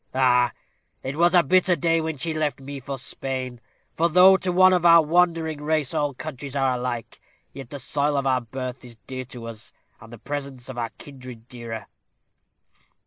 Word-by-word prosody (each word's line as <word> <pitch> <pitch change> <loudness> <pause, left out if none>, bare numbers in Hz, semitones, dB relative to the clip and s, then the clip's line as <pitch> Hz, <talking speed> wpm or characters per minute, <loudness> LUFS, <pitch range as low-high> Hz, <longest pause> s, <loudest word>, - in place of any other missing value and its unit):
Ah! 125 -2 +4 0.5
it 135 +2 -4
was 175 +3 +3
a 175 - +6
bitter 185 +4 +3
day 165 +1 +1
when 160 -1 -3
she 160 +4 -2
left 150 -4 -1
me 140 +1 -7
for 135 +1 -6
Spain; 130 -1 -4 0.3
for 170 +1 +2
though, 185 +3 +7
to 190 -1 -1
one 185 +1 +6
of 180 -2 +2
our 170 -1 +7
wandering 165 -2 +1
race, 150 -2 0
all 145 -2 -1
countries 140 -1 -7
are 135 -2 +2
alike, 125 -2 -4 0.3
yet 135 -3 -9
the 145 - -6
soil 145 +2 -1
of 140 - -1
our 130 -1 +2
birth 130 +2 -6
is 120 -2 -12
dear 130 -1 -6
to 120 -2 -10
us, 115 -2 -8 0.3
and 115 - -14
the 120 - -9
presence 140 -1 -5
of 130 - -7
our 115 -1 -2
kindred 125 -5 -11
dearer. 115 -4 -7
135 Hz, 190 wpm, -24 LUFS, 125-160 Hz, 0.5 s, though